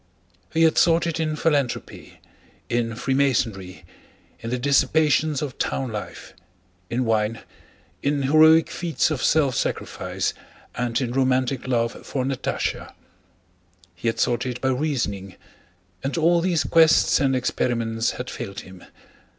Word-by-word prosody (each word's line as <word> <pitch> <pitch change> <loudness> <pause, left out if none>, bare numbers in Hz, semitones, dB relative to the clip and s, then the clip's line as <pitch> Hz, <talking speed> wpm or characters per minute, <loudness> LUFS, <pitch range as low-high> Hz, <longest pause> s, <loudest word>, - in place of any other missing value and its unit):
He 165 0 +2
had 160 -1 +4
sought 165 -1 +3
it 165 -1 -2
in 155 -1 -1
philanthropy, 145 -5 -2 0.5
in 115 -1 -1
Freemasonry, 115 - -1 0.5
in 115 - -6
the 125 - -1
dissipations 145 +3 +2
of 140 -3 -6
town 130 -3 -2
life, 105 -1 -7 0.6
in 125 +2 -1
wine, 110 0 0 0.6
in 140 0 0
heroic 155 +3 +5
feats 170 -2 -1
of 145 - -2
self 145 -4 +3
sacrifice, - - -2 0.4
and 120 0 -1
in 125 -3 -2
romantic 130 0 0
love 115 -2 -1
for 130 -2 -3
Natásha; 135 -1 -3 1.0
he 90 +7 -5
had 115 - -1
sought 125 0 +1
it 125 -1 -4
by 130 - 0
reasoning—and 100 - -5
all 170 +1 +3
these 170 -3 +1
quests 160 +3 +4
and 135 -2 +2
experiments 115 -2 -1
had 125 - -5
failed 100 -4 -6
him. 95 -1 -14
130 Hz, 130 wpm, -23 LUFS, 115-150 Hz, 1.0 s, heroic